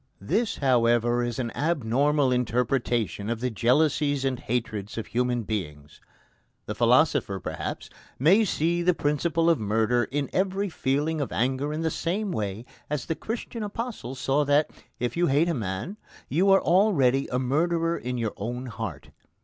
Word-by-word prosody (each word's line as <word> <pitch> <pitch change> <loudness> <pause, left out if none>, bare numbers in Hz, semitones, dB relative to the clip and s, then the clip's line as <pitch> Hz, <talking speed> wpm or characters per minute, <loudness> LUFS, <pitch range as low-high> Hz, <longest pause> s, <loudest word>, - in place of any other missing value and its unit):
This, 210 - 0
however, 120 -2 +2
is 120 -1 -3
an 120 -3 -2
abnormal 145 -1 +1
interpretation 120 -4 0
of 115 -1 -2
the 125 +1 -1
jealousies 145 +4 +2
and 130 -2 -1
hatreds 110 -3 -3
of 115 - -3
human 125 0 -1
beings. 75 -9 -5 0.6
The - - -4
philosopher, - - +3
perhaps, - - -5 0.3
may 185 - +5
see 175 -3 0
the 180 0 +2
principle 165 +3 0
of 165 -2 +4
murder 110 +3 +1
in 140 0 -2
every 195 +1 0
feeling 150 +1 -1
of 140 - -3
anger 130 +5 0
in 155 +1 -3
the 160 -1 0
same 195 +6 -2
way 105 - -3 0.2
as 150 -3 -2
the - - -1
Christian 225 +6 -5
Apostle 210 - -5
saw 140 +2 +1
that, 145 +2 +2 0.3
if 125 - -2
you 175 0 +2
hate 145 +5 +3
a - - +1
man, 110 - -4 0.3
you 180 +8 +2
are 195 0 +6
already 165 -9 +3
a 125 - -2
murderer 165 +6 +1
in 125 -4 -4
your 115 -3 -2
own 120 +5 -4
heart. 110 - -6
135 Hz, 160 wpm, -26 LUFS, 120-165 Hz, 0.6 s, are